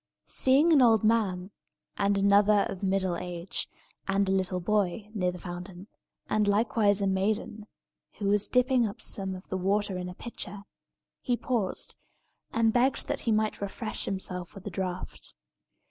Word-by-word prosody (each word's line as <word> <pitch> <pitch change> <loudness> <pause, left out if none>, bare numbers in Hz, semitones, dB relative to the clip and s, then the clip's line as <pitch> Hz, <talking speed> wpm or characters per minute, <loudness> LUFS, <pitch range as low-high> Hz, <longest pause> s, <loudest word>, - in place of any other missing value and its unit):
Seeing 285 +6 +4
an 285 - +6
old 225 -4 +5
man, 205 -4 +1 0.4
and 200 0 +1
another 200 +1 +5
of 185 - -7
middle 190 -2 +1
age, 175 0 -4 0.4
and 195 0 +2
a - - +1
little 185 -1 0
boy, 205 +2 0
near 180 -4 0
the 180 - -8
fountain, 180 +1 -8 0.4
and 215 -1 +1
likewise 205 -1 +2
a - - +2
maiden, 205 +2 -1 0.5
who 205 - -5
was 205 0 +3
dipping 250 -2 +3
up 200 - -8
some 195 -1 -2
of 185 - -11
the 190 - -1
water 195 0 0
in 180 0 -4
a 180 - -9
pitcher, 205 -3 -8 0.6
he 245 -2 0
paused, 230 -8 -2 0.5
and 225 -1 +2
begged 255 +2 +2
that - - -1
he - - +4
might 215 -1 0
refresh 215 +3 -4
himself 180 -2 -4
with 195 - -11
a - - -4
draught. 185 -1 -5
200 Hz, 160 wpm, -28 LUFS, 185-215 Hz, 0.6 s, an